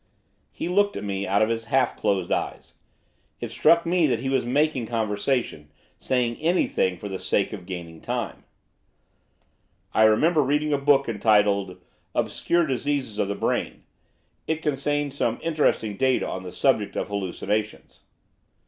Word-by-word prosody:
He - - -5
looked 205 +3 +2
at - - -5
me 100 -1 -3
out 100 +2 +3
of 110 - +1
his 115 -1 -2
half 125 +1 +1
closed 95 -3 -1
eyes. - - -3 0.7
It - - -5
struck 170 0 +4
me 170 -1 +3
that 125 -4 +1
he 135 +2 -3
was 135 -1 +1
making 135 -2 +1
conversation, 110 - -1 0.3
saying 125 -3 0
anything 155 - +1
for 105 - -7
the 95 -2 -5
sake - - 0
of 90 - -8
gaining 85 -3 -7
time. - - -4 1.5
'I 110 - +5
remember 155 +10 +4
reading 150 +2 +1
a 140 - +1
book 140 -1 +3
entitled 105 -3 +2 0.4
"Obscure 170 -1 +1
Diseases 135 -4 -2
of - - +1
the 100 - -2
Brain." - - -2 0.6
It 160 0 -2
contained 145 -1 -1
some 120 -4 -1
interesting 150 -10 0
data 130 -1 +2
on 95 - -4
the 90 -1 -8
subject - - +1
of - - -3
hallucinations. 100 +2 -3
120 Hz, 150 wpm, -25 LUFS, 100-145 Hz, 1.5 s, I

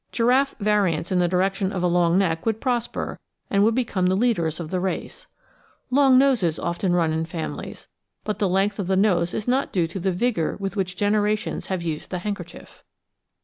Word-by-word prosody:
Giraffe 255 +4 +2
variants 200 -6 +1
in 185 - +2
the 175 - +3
direction 190 +2 0
of 185 -3 -3
a - - +3
long 175 0 +3
neck 165 -4 +1
would 220 -1 -1
prosper, 245 -2 -2 0.3
and 200 0 +3
would 225 +1 +3
become 210 -7 0
the 185 - +2
leaders 185 -8 0
of 160 -2 -6
the 185 - 0
race. 185 +1 -4 0.6
Long 265 -1 +5
noses 245 - +3
often 175 +1 -1
run 165 -3 +2
in 160 0 -1
families, 165 -1 -6 0.4
but 210 -1 -3
the 200 -4 +1
length 195 +3 +1
of 195 - -2
the 190 - +2
nose 175 -4 +2
is 215 - -4
not 260 +3 +1
due 175 -3 +1
to 170 +4 -6
the 190 +2 0
vigour 180 -3 -1
with 195 +1 -4
which 185 -2 -2
generations 210 +1 0
have 185 -3 -2
used 160 -3 -4
the 180 - -3
handkerchief. 200 +3 -7
190 Hz, 195 wpm, -23 LUFS, 175-215 Hz, 0.6 s, Long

